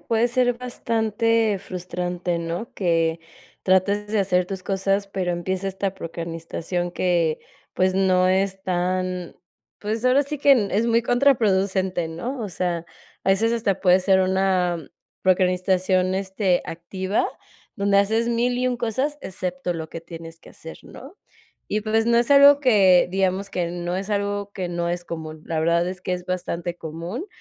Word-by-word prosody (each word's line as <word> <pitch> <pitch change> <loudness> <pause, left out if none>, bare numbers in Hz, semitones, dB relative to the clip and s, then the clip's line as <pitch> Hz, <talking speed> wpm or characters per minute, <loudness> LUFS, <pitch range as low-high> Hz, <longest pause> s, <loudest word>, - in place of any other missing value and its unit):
puede 230 +1 +1
ser 245 0 +2
bastante 230 -3 0
frustrante, 180 -1 -4
¿no? 170 +7 -4
Que 165 -3 +1 0.4
trates 200 +2 +2
de 215 0 0
hacer 180 -2 +2
tus 190 -1 -6
cosas, 195 +1 0
pero 185 -3 -2
empieza 185 +2 -2
esta 195 0 -3
procrastinación 170 0 -4
que, 170 -3 +1 0.4
pues 185 0 +2
no 185 -1 +3
es 190 0 0
tan, 180 0 -2 0.4
pues, 220 +3 -3
ahora 255 +3 +4
sí 295 +1 -5
que 265 -8 +4
es 220 +4 +2
muy 230 0 +3
contraproducente, 195 -9 +2
¿no? 235 +11 -5
O 210 - -3
sea, 175 -1 -2 0.4
a 190 - +3
veces 220 +4 +2
hasta 205 -5 0
puede 185 -1 +5
ser 190 0 +3
una 185 -2 +1 0.4
procrastinación,, 185 0 +2
este, 190 -1 0
activa, 185 +4 -2 0.5
donde 200 0 +3
haces 220 +4 +2
1000, 240 +1 +1
y 255 - +1
1 250 -1 0
cosas, 260 +6 -2
excepto 180 -1 -4
lo 160 -2 -6
que 165 - -7
tienes 165 0 -10
que - - -15
hacer, 160 - -11
¿no? 280 +10 -12 0.5
Y 210 0 -1
pues, 225 +1 +1
no 235 0 +4
es 240 - 0
algo 280 0 +8
que, 195 -10 +5
digamos, 190 +1 0
que 170 -2 -2
no 175 0 -3
es 195 +2 -4
algo 205 0 -1
que 185 -3 -4
no 170 0 -2
es 175 0 -3
común, 160 -2 -7
la 160 -1 -1
verdad 170 +2 +2
es 185 0 -6
que 185 - -3
es 180 0 -8
bastante 175 -1 -3
común, 170 - -6
190 Hz, 160 wpm, -23 LUFS, 175-215 Hz, 0.5 s, algo